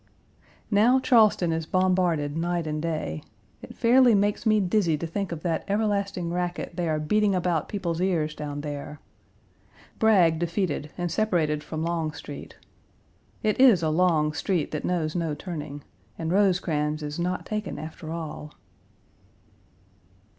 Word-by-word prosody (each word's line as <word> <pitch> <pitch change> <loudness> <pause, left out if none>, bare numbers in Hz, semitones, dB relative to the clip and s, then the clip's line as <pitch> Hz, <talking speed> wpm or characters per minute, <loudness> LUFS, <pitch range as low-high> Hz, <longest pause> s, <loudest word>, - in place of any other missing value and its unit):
Now, 230 +6 +5
Charleston 215 -9 +4
is 160 -1 -2
bombarded 180 -6 +1
night 170 0 -1
and 155 0 -3
day. 155 - -3 0.4
It - - -11
fairly 245 0 +5
makes 205 +3 +1
me 215 -1 +4
dizzy 180 -4 +1
to 170 - -4
think 190 +3 -3
of 160 -2 -6
that 170 -2 -1
everlasting 200 -4 -1
racket 175 -1 -3
they 175 -2 -1
are 155 -1 0
beating 205 +5 +2
about 175 -3 0
people's 175 -4 -2
ears 165 -5 0
down 145 -1 -5
there. 145 0 -6 1.0
Bragg 180 -8 +4
defeated, 170 -3 -2
and 175 -1 -2
separated 160 -8 0
from 155 +1 -4
Longstreet. 165 -2 -4 0.9
It 215 +1 +1
is 235 -10 +6
a 160 - +2
long 155 -2 +2
street 175 -2 -1
that 155 - -3
knows 165 -3 -1
no 165 -4 -1
turning, 145 -5 -7 0.3
and 165 0 -3
Rosecrans 160 -6 +1
is 150 +2 -5
not 180 +1 -2
taken 210 -3 -4
after 155 0 -7
all. 155 -2 -6
170 Hz, 140 wpm, -26 LUFS, 155-195 Hz, 1.0 s, is